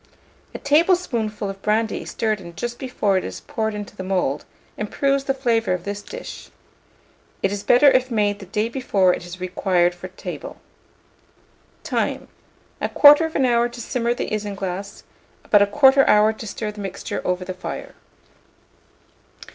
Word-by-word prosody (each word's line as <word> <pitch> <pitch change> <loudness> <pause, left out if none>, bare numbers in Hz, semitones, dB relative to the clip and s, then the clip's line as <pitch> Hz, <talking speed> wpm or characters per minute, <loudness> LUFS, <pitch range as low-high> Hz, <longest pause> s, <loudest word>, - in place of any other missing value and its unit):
A - - -2
tablespoonful 285 - +1
of 195 0 -7
brandy 220 +2 0
stirred 215 -3 -1
in 170 -2 -11
just 240 +5 -5
before 210 -7 0
it - - -8
is - - -7
poured 220 -1 -3
into 205 -1 -7
the 190 - -6
mould, 180 -7 -1 0.3
improves 275 +6 0
the 270 - +1
flavour 235 -6 +1
of 180 -1 -3
this 205 +1 -4
dish: - - -9 0.9
it - - +2
is 205 -1 -3
better 245 +7 +4
if 255 -2 +5
made 205 -3 0
the 195 - -10
day 210 +4 -1
before 205 -7 +2
it - - -5
is 180 +1 -9
required 180 -1 +1
for 175 +1 -9
table. 185 - -8 1.3
Time. - - -2 0.5
1/4 295 -1 +5
hour 240 -1 +2
to 240 0 -11
simmer 240 0 -1
the - - -4
isinglass; 200 -2 -4 0.4
about 205 -1 +4
1/4 270 +1 +6
hour 210 +1 +5
to 220 0 -9
stir 210 +1 -4
the 210 0 -9
mixture 195 -2 -5
over 180 0 -1
the 185 - -4
fire. 185 - -7
210 Hz, 155 wpm, -22 LUFS, 195-245 Hz, 1.3 s, 1/4